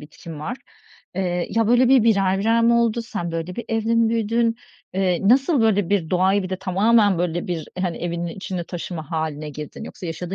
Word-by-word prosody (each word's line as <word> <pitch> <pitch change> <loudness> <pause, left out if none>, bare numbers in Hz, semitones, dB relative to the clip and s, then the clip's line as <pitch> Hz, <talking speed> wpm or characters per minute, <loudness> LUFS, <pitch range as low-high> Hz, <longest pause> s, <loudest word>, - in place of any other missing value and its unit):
bitkin 150 +1 -10
var. 240 +11 -4 0.6
Eee, 180 -2 -1
ya, 225 -1 +1
böyle, 245 +1 +4
bir 260 -3 +6
birer 195 -4 +3
birer 225 +3 +2
mi 235 +1 +4
oldu? 235 0 +2
Sen, 175 -7 -4
böyle, 165 +2 -4
bir 240 - -4
evde 225 0 0
mi 230 -1 +3
büyüdün? 230 +1 +1 0.4
Eee, 190 0 +1
nasıl, 270 +3 +4
böyle, 205 -5 +2
bir 185 -6 0
doğayı 190 +2 +2
bir 185 - -5
de 185 - -1
tamamen, 205 +1 +3
böyle 175 -1 -1
bir 170 -3 -4
hani, 180 -2 -1
evinin 170 0 -3
içinde 180 0 -5
taşıma 170 -3 -6
hâline 155 -2 -3
girdin? 150 0 -8
Yoksa 185 - -8
yaşadığın 175 +3 -5
190 Hz, 195 wpm, -22 LUFS, 175-225 Hz, 0.6 s, bir